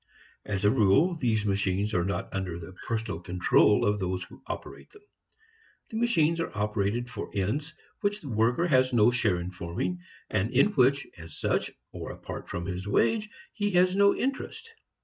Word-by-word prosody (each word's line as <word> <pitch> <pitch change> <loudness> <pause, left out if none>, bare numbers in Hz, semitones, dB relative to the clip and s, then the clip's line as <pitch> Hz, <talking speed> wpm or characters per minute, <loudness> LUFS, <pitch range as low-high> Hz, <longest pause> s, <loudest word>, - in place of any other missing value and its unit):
As 100 0 -2
a 105 - +6
rule, 135 - +4
these 115 -9 0
machines 100 +1 0
are 90 - +2
not 100 +3 -3
under 95 -3 -3
the 85 +2 -9
personal 110 -6 -2
control 90 +3 +3
of 105 0 +1
those 95 -1 -2
who 90 - -14
operate - - -7
them. 420 0 -19 0.9
The 220 - -3
machines 170 -9 +2
are 165 - -1
operated 105 +3 0
for 115 -4 -6
ends 135 - -2 0.2
which 205 0 -1
the 145 - -8
worker 115 +8 +2
has 130 -5 +3
no 120 0 +5
share 110 -7 +1
in 90 +1 -5
forming 95 - -3 0.3
and 105 +1 0
in 135 +12 +4
which 140 -2 +3
as 80 -2 -10
such, - - 0 0.2
or - - -6
apart - - -8
from 85 - -4
his 95 +1 -4
wage, 210 - +2 0.2
he 205 -2 -1
has 180 +1 +4
no 200 0 +5
interest. 275 - -4
110 Hz, 175 wpm, -28 LUFS, 95-160 Hz, 0.9 s, a